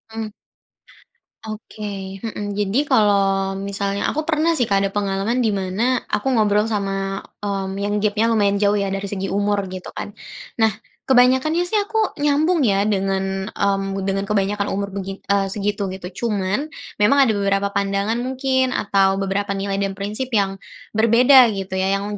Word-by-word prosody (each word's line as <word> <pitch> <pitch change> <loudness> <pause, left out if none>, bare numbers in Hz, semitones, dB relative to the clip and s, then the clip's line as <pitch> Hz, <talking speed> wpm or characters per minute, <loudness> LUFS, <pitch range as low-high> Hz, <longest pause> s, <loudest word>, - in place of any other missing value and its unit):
Mmm. 220 -1 -3 1.2
Oke. 215 0 -8 0.4
Mhm. 210 -2 -5
Jadi 205 +3 -1
kalau 195 -5 +2
misalnya 200 0 -1
aku 310 +2 -3
pernah 320 +1 +2
sih 240 - +2
Kak 195 0 +2
ada 195 - -1
pengalaman 205 +4 -1
di 220 -4 +1
mana 190 +3 -2 0.3
aku 240 - -1
ngobrol 210 0 +3
sama, 195 -2 -2 0.2
mmm, 195 -1 -3
yang 205 +1 -1
gap-nya 210 +2 +2
lumayan 200 -3 +2
jauh 205 0 +3
ya 200 -1 -1
dari 195 +1 -3
segi 195 -1 -3
umur, 200 0 +1
gitu 185 -1 -7
kan. 205 - -5 0.5
Nah, 220 - +5 0.4
kebanyakannya 260 +6 +4
sih 420 +3 +1
aku, 435 +2 -2 0.2
nyambung 300 +4 +2
ya 200 0 +2
dengan, 195 -1 -1
mmm, 195 -1 0
dengan 195 0 -1
kebanyakan 200 0 0
umur 200 0 -3
begi 195 0 -6
eee, 200 -1 +2
segitu, 200 0 -2
gitu. 190 +5 -5
Cuman, 205 +7 -1 0.3
memang 215 +7 +5
ada 230 - +3
beberapa 200 -1 0
pandangan 200 +3 0
mungkin 260 0 0
atau 195 -1 +2
beberapa 195 +1 -1
nilai 195 0 -2
dan 195 -1 -2
prinsip 210 +6 -3
yang 195 -1 +1 0.3
berbeda 240 +4 +6
gitu 195 -1 -5
ya, 190 - +1
yang 195 - -3
200 Hz, 160 wpm, -21 LUFS, 195-225 Hz, 1.2 s, berbeda